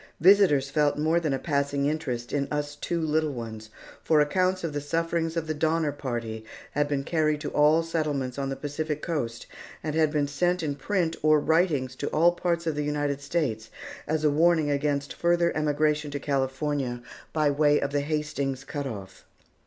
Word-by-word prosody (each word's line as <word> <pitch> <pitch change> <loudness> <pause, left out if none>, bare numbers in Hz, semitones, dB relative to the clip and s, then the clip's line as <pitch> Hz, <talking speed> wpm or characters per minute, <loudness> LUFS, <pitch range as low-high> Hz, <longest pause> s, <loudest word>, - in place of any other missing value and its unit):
Visitors 170 -7 +5
felt 150 -1 +2
more 160 +3 +2
than 160 -4 -1
a 135 - +1
passing 140 -1 0
interest 140 -6 -2
in 140 -1 0
us 145 0 -2
two 170 +3 -2
little 155 -1 +1
ones, 110 -3 -7 0.3
for 155 -2 +4
accounts 185 +5 +1
of 165 -3 -2
the 145 - -2
sufferings 165 +2 -1
of 165 - -1
the 155 - -2
Donner 160 0 +1
Party 120 -6 -4 0.3
had 145 0 +1
been 140 -1 -1
carried 155 -1 +1
to - - -4
all 150 +2 +4
the - - -9
settlements 145 -6 -2
on 135 -1 -2
the 135 - -2
Pacific 150 +1 -4
coast 120 -9 -3 0.4
and 155 0 -2
had 155 -1 +2
been 150 -2 +1
sent 175 +5 0
in 145 -2 -1
print 170 +1 -1
or 155 0 +5
writings 150 -5 +1
to 145 - -3
all 170 +2 +4
parts 170 -1 -1
of 160 - 0
the 150 0 -2
United 145 -1 -1
States 125 -8 -2 0.4
as 155 0 0
a 150 - +4
warning 160 0 +3
against 145 0 -1
further 170 0 +1
emigration 150 0 +1
to 145 0 -4
California 135 -2 -1 0.3
by 155 -2 +2
way 145 0 +3
of 140 0 -3
Hastings 145 -2 -2
Cut 145 0 -4
Off. 100 -6 -8
150 Hz, 185 wpm, -27 LUFS, 140-160 Hz, 0.4 s, Visitors